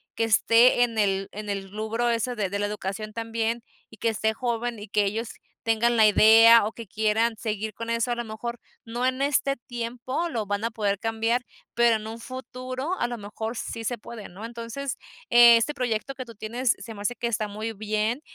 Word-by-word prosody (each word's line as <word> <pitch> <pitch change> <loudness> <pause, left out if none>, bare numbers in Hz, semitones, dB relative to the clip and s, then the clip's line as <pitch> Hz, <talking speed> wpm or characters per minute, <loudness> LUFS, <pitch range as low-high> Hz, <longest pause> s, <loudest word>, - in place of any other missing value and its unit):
que 225 - 0
esté 230 +2 +5
en 230 -2 -2
el 195 -2 +1
en 210 0 -7
el 195 -1 -4
rubro 220 +3 -1
ese 235 +2 0
de 200 -4 -1
de 200 - -2
la 205 - 0
educación 210 +1 -4
también 230 +1 -2 0.3
y 220 - -15
que 230 - +1
esté 220 0 0
joven 235 0 -2
y 210 - -8
que 210 +1 +2
ellos 220 +3 -2 0.3
tengan 230 +1 +2
la 220 -2 +6
idea 225 +1 +7
o 220 - -3
que 230 -3 -9
quieran 220 +2 +1
seguir 215 -1 -3
con 230 +2 -6
eso 230 +1 0
a - - +1
lo 240 - -3
mejor 235 +2 -6 0.3
no 240 +2 -2
en 260 +1 0
este 275 -1 +2
tiempo 245 +5 -4
lo 230 -7 -2
van 205 +1 -2
a 230 - -1
poder 205 -3 -1
cambiar, 225 +2 0 0.3
pero 235 -1 +4
en 215 - -9
un 225 +1 -7
futuro 255 +6 -5
a 240 - +1
lo 240 0 -5
mejor 220 +2 -5
sí 225 -1 -5
se 245 - -1
puede, 220 0 -9
¿no? 190 +5 -11
Entonces, 235 +4 -5 0.3
eh, 240 0 +9
este 230 +6 +1
proyecto 250 0 -2
que 255 - -6
tú 230 -2 -12
tienes 235 +4 0
se 225 - -8
me 205 - -9
hace 240 +4 -1
que 240 - -2
está 215 -2 -1
muy 215 +2 -4
bien 215 +4 -1
230 Hz, 215 wpm, -26 LUFS, 215-240 Hz, 0.3 s, eh